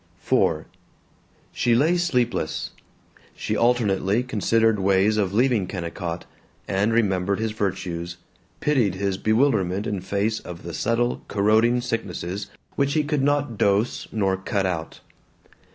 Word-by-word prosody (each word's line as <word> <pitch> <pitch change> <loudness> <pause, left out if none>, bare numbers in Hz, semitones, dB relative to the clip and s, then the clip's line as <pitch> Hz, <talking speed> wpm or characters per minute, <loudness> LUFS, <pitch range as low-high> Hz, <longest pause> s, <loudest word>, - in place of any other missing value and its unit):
IV - - +2 0.9
She 120 -2 +2
lay 155 +8 +3
sleepless. 125 -9 0 0.6
She - - -2
alternately 115 -2 +2
considered 115 -2 +2
ways 100 +2 +3
of 100 -3 +1
leaving 115 -3 +2
Kennicott, 85 -2 -5 0.4
and 100 +4 +1
remembered 100 -4 +1
his 110 0 -1
virtues, 90 -4 -3 0.4
pitied 125 -11 +2
his 100 0 -1
bewilderment 110 -5 +2
in 100 -3 -2
face 100 +4 -1
of 85 -2 -9
the 85 0 -6
subtle 120 +7 0
corroding 110 +4 +3
sicknesses 100 -4 -4 0.3
which 140 0 +1
he 155 - +3
could 145 -1 0
not 145 -5 0
dose 100 +3 +1
nor 95 -3 +1
cut 95 0 -1
out. 85 -4 -4
105 Hz, 125 wpm, -24 LUFS, 95-120 Hz, 0.9 s, lay